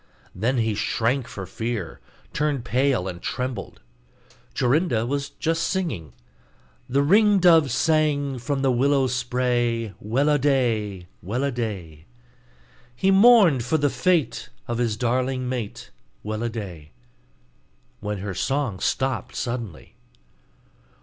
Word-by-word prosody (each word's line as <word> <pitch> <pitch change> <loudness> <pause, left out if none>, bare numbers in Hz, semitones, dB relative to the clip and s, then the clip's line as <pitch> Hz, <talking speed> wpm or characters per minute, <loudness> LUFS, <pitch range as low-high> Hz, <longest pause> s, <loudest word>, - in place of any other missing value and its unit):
Then 120 +7 0
he 110 -2 +1
shrank 115 +4 0
for 95 - -7
fear, 110 -4 -4 0.3
turned 145 -5 -1
pale, 125 -5 +1
and 90 -1 -6
trembled. 125 - -4 0.7
Jorinda 125 -3 +1
was 140 +2 -2
just 165 0 -2
singing, 170 - -3 0.8
'The 140 +3 +2
ring 205 +6 +5
dove 165 -6 +5
sang 145 -1 +1
from 135 +2 -2
the 135 - +3
willow 135 +2 +2
spray, 120 -3 0
Well 130 +8 +1
a 145 -1 +3
day! 115 -9 0 0.2
Well 120 +8 -2
a 140 - 0
day! 95 - -5 0.9
He 190 +9 +2
mourn'd 195 - +6
for 145 +7 +1
the 145 -2 +1
fate 180 -6 0 0.2
of 120 0 -2
his 115 -3 0
darling 130 +2 0
mate, 125 -5 -5 0.3
Well 110 +1 -4
a 120 - -1
day!' 90 -9 -8 1.1
when 105 -1 -3
her 100 - -3
song 130 -1 -1
stopped 130 0 -1
suddenly. 120 - -5
125 Hz, 125 wpm, -24 LUFS, 110-140 Hz, 1.1 s, mourn'd